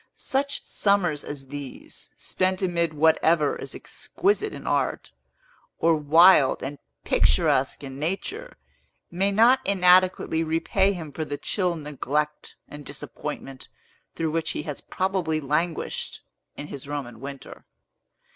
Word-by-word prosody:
Such 280 Hz, +1 st, -2 dB
summers 180 Hz, -7 st, +1 dB
as 135 Hz, -2 st, -8 dB
these, 145 Hz, -2 st, -9 dB
spent 185 Hz, +1 st, -1 dB
amid 170 Hz, -3 st, 0 dB
whatever 160 Hz, 0 st, +3 dB
is -, -, -8 dB
exquisite 405 Hz, +3 st, -1 dB
in -, -, -9 dB
art, -, -, -1 dB, 0.7 s
or 165 Hz, 0 st, +3 dB
wild 155 Hz, -1 st, +5 dB
and 140 Hz, +2 st, -5 dB, 0.2 s
picturesque -, -, +2 dB
in 135 Hz, 0 st, -8 dB
nature, 375 Hz, -, -4 dB, 0.5 s
may 190 Hz, +3 st, +1 dB
not 235 Hz, +6 st, +5 dB
inadequately 180 Hz, -3 st, +4 dB
repay 165 Hz, +5 st, +1 dB
him 160 Hz, -5 st, -7 dB
for 155 Hz, +3 st, -4 dB
the 145 Hz, -2 st, -4 dB
chill 180 Hz, 0 st, -1 dB
neglect 150 Hz, 0 st, -3 dB
and 145 Hz, 0 st, -10 dB
disappointment 140 Hz, -1 st, -7 dB, 0.5 s
through 160 Hz, -1 st, -1 dB
which 160 Hz, 0 st, -1 dB
he -, -, -4 dB
has 150 Hz, -3 st, -6 dB
probably 185 Hz, -4 st, -1 dB
languished, 155 Hz, +3 st, -2 dB, 0.3 s
in 145 Hz, -, -6 dB
his 140 Hz, -1 st, -8 dB
Roman 135 Hz, -6 st, -5 dB
winter. 140 Hz, +1 st, -9 dB
160 Hz, 125 wpm, -25 LUFS, 145-185 Hz, 0.7 s, wild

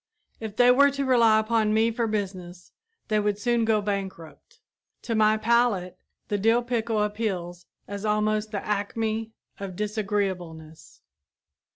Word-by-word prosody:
If 220 Hz, -2 st, -6 dB
they 245 Hz, +1 st, +6 dB
were 280 Hz, +3 st, +6 dB
to 280 Hz, 0 st, -3 dB
rely 235 Hz, -4 st, +5 dB
upon 215 Hz, -1 st, +1 dB
me 225 Hz, +1 st, +3 dB
for 230 Hz, 0 st, -1 dB
business, 185 Hz, -4 st, -5 dB, 0.4 s
they 215 Hz, -1 st, +2 dB
would 205 Hz, -1 st, 0 dB
soon 235 Hz, +2 st, +1 dB
go 215 Hz, -2 st, +2 dB
bankrupt. 195 Hz, -, -6 dB, 0.4 s
To 230 Hz, -, -3 dB
my 215 Hz, 0 st, +3 dB
palate 220 Hz, -5 st, +1 dB, 0.3 s
the 205 Hz, -, -1 dB
dill 225 Hz, +4 st, +3 dB
pickle 230 Hz, -3 st, -1 dB
appeals 185 Hz, -5 st, -4 dB, 0.2 s
as 200 Hz, 0 st, -6 dB
almost 215 Hz, 0 st, 0 dB
the 205 Hz, -2 st, -5 dB
acme 220 Hz, +2 st, -2 dB, 0.3 s
of 195 Hz, -2 st, -6 dB
disagreeableness. 190 Hz, -6 st, -4 dB
215 Hz, 140 wpm, -25 LUFS, 200-225 Hz, 0.4 s, they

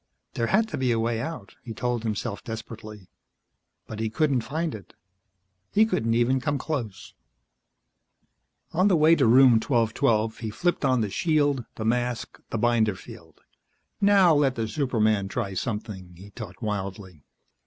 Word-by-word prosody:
There 115 Hz, -, -1 dB
had 220 Hz, -, +2 dB
to -, -, -4 dB
be 130 Hz, -2 st, +1 dB
a 115 Hz, -, +1 dB
way 115 Hz, 0 st, -1 dB
out, 130 Hz, -8 st, -6 dB
he 115 Hz, -2 st, -8 dB
told 125 Hz, -2 st, -1 dB
himself 110 Hz, -1 st, -4 dB
desperately. 110 Hz, -3 st, -9 dB, 0.7 s
But 110 Hz, -, -8 dB
he 110 Hz, 0 st, -1 dB
couldn't 135 Hz, +2 st, +1 dB
find 160 Hz, +6 st, -3 dB
it. 105 Hz, -3 st, -11 dB, 0.8 s
He 215 Hz, +2 st, +4 dB
couldn't 115 Hz, -, 0 dB
even 125 Hz, +2 st, +2 dB
come 145 Hz, +1 st, -1 dB
close. 130 Hz, -9 st, -5 dB, 1.6 s
On 185 Hz, +4 st, +3 dB
the 195 Hz, -, +4 dB
way 160 Hz, +1 st, +5 dB
to 135 Hz, -7 st, +2 dB
Room 125 Hz, -1 st, +6 dB
1212, 115 Hz, -2 st, +1 dB
he 110 Hz, -, -4 dB
flipped 175 Hz, +12 st, -1 dB
on 130 Hz, -3 st, +2 dB
the 105 Hz, -3 st, -2 dB
shield, 145 Hz, -, +1 dB
the 110 Hz, -, -5 dB
mask, 120 Hz, +1 st, -2 dB
the -, -, -2 dB
binder 110 Hz, -3 st, +2 dB
field. 95 Hz, -, -14 dB, 0.6 s
Now 195 Hz, -4 st, +5 dB
let 140 Hz, -3 st, +2 dB
the 115 Hz, -2 st, -2 dB
superman 110 Hz, -6 st, 0 dB
try 100 Hz, -1 st, -3 dB
something, 100 Hz, -4 st, -5 dB
he 100 Hz, +4 st, -13 dB
thought 110 Hz, 0 st, -9 dB
wildly. 95 Hz, -6 st, -5 dB
115 Hz, 155 wpm, -25 LUFS, 110-140 Hz, 1.6 s, Room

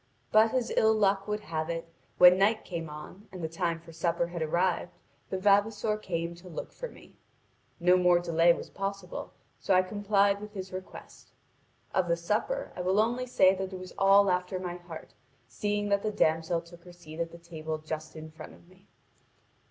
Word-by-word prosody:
But 220 Hz, +1 st, +5 dB
as 245 Hz, -2 st, 0 dB
ill 220 Hz, 0 st, +4 dB
luck 200 Hz, -1 st, +2 dB
would 210 Hz, 0 st, -2 dB
have 155 Hz, -3 st, -3 dB
it, 165 Hz, 0 st, -3 dB, 0.3 s
when 180 Hz, +1 st, +8 dB
night 215 Hz, +3 st, +2 dB
came 165 Hz, -3 st, -5 dB
on, 150 Hz, +7 st, -10 dB
and 185 Hz, -3 st, -8 dB
the -, -, 0 dB
time 165 Hz, +1 st, -2 dB
for 165 Hz, 0 st, -14 dB
supper 170 Hz, +1 st, 0 dB
had 170 Hz, 0 st, -6 dB
arrived. 175 Hz, +2 st, 0 dB, 0.3 s
The 190 Hz, -, -2 dB
vavasor 205 Hz, +2 st, +2 dB
came 170 Hz, -4 st, -3 dB
to 180 Hz, +1 st, -13 dB
look 165 Hz, -, -6 dB
for -, -, -7 dB
me. -, -, -17 dB, 0.6 s
No 180 Hz, +1 st, +5 dB
more 180 Hz, -1 st, +5 dB
delay 170 Hz, 0 st, +4 dB
was -, -, -3 dB
possible, 195 Hz, -2 st, -5 dB, 0.3 s
so 195 Hz, -, +2 dB
I 185 Hz, -, +5 dB
complied 200 Hz, 0 st, +1 dB
with 210 Hz, 0 st, -9 dB
his 185 Hz, -1 st, -6 dB
request. 185 Hz, 0 st, -10 dB, 0.6 s
Of 185 Hz, -2 st, +1 dB
the 170 Hz, 0 st, +1 dB
supper 215 Hz, -, -2 dB
I -, -, -4 dB
will 185 Hz, +3 st, +2 dB
only 240 Hz, +3 st, +1 dB
say 190 Hz, -6 st, +5 dB
that 190 Hz, 0 st, -4 dB
it -, -, -4 dB
was 185 Hz, 0 st, -9 dB
all 195 Hz, 0 st, +6 dB
after 180 Hz, +1 st, -1 dB
my 180 Hz, -1 st, -4 dB
heart, 175 Hz, -2 st, -11 dB, 0.3 s
seeing 205 Hz, 0 st, -2 dB
that 200 Hz, 0 st, +2 dB
the 215 Hz, -, -1 dB
damsel 165 Hz, -2 st, +1 dB
took 170 Hz, 0 st, -16 dB
her 175 Hz, -, -12 dB
seat 165 Hz, -2 st, -11 dB
at 165 Hz, 0 st, -2 dB
the 170 Hz, -, -11 dB
table 160 Hz, -2 st, -5 dB
just 155 Hz, 0 st, -6 dB
in 155 Hz, 0 st, -9 dB
front 155 Hz, -, -11 dB
of -, -, -21 dB
me. 185 Hz, +2 st, -22 dB
180 Hz, 200 wpm, -29 LUFS, 170-200 Hz, 0.6 s, when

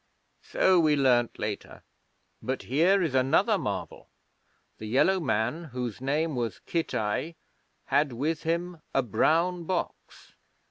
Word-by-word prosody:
'So 185 Hz, -1 st, +3 dB
we 155 Hz, -2 st, +4 dB
learned 125 Hz, -4 st, +3 dB
later. 105 Hz, -1 st, -5 dB, 0.6 s
But 130 Hz, +1 st, -3 dB
here 175 Hz, +9 st, +3 dB
is 160 Hz, -6 st, -1 dB
another 130 Hz, 0 st, +3 dB
marvel. -, -, -5 dB, 0.7 s
The 110 Hz, -, -6 dB
Yellow 160 Hz, -, +3 dB
Man, 135 Hz, +2 st, -1 dB
whose 125 Hz, -5 st, -5 dB
name 150 Hz, +3 st, 0 dB
was 120 Hz, -2 st, -3 dB
Kitai, 155 Hz, -1 st, -2 dB, 0.5 s
had 145 Hz, +1 st, +2 dB
with 150 Hz, +6 st, -2 dB
him 170 Hz, 0 st, -2 dB
a 135 Hz, -, +3 dB
brown 170 Hz, -, +1 dB
box. 185 Hz, +1 st, -5 dB
145 Hz, 125 wpm, -27 LUFS, 125-165 Hz, 0.7 s, we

